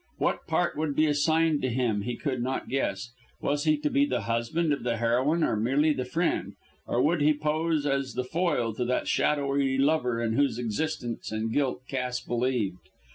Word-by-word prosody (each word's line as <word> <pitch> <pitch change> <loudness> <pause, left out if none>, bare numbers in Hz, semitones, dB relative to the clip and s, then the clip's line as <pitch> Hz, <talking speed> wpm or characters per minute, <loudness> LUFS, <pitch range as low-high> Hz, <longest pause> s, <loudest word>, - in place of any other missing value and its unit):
What - - -1
part - - +1
would 155 -2 -1
be 155 - +4
assigned 155 +1 +2
to 130 - 0
him 115 -4 0
he 120 +3 -3
could 130 -5 -2
not 130 +2 -3
guess. 120 -4 -2 0.3
Was 145 +2 -1
he 155 -1 +4
to 150 - +1
be 140 - +3
the 125 -4 -1
husband 115 +9 0
of 140 - -3
the 120 -1 -1
heroine 130 +8 +2
or - - +1
merely 135 +8 +2
the 130 -3 -3
friend, 165 +7 -1 0.3
or 120 - 0
would 160 +1 +2
he 150 +1 +4
pose 155 +1 0
as 135 -2 -1
the 125 - -1
foil 130 -5 0
to 125 +3 -2
that 125 +1 -1
shadowy 140 -2 +1
lover 135 -4 +2
in 115 -1 0
whose 140 -1 +2
existence 120 +1 -3
and 110 +1 -2
guilt 135 -3 0
Cass 125 -2 -2
believed? 120 -7 -1
135 Hz, 190 wpm, -27 LUFS, 120-150 Hz, 0.3 s, be